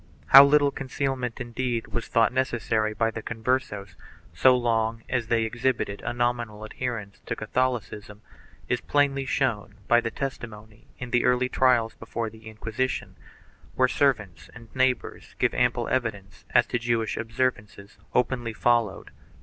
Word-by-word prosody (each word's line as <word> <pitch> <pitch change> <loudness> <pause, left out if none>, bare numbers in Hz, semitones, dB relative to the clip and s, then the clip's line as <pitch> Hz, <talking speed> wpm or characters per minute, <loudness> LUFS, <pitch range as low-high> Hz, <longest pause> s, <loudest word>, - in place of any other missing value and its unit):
How 135 +1 +11
little 145 0 +4
concealment, 135 -3 -3
indeed, 120 -1 -3
was 115 - -4
thought 115 +1 +2
necessary 110 -4 0
by 115 +1 +1
the 110 - -6
Converses, 110 -5 -2 0.4
so 125 +10 +5
long 115 -2 0
as 120 -3 -1
they 115 -1 +2
exhibited 120 -3 -1
a 120 - -3
nominal 120 -3 -2
adherence 110 -3 -5
to - - -2
Catholicism, 110 -3 -3 0.4
is - - -1
plainly 140 -2 +1
shown 120 -7 -1
by 120 0 +5
the 115 - -2
testimony 110 -5 -7
in 125 -1 -7
the 120 - +3
early 125 0 +2
trials 120 -4 +2
before 115 0 -5
the 110 0 -14
Inquisition, 110 +4 -3 0.6
where 130 - +4
servants 125 - 0
and 115 0 -14
neighbors 130 -1 -1
give - - +1
ample - - +1
evidence 110 -5 -3
as 120 -1 +4
to 120 - -2
Jewish 115 -1 -1
observances 110 -3 -3 0.2
openly 120 -2 0
followed. 120 -3 0
120 Hz, 140 wpm, -26 LUFS, 110-130 Hz, 0.6 s, How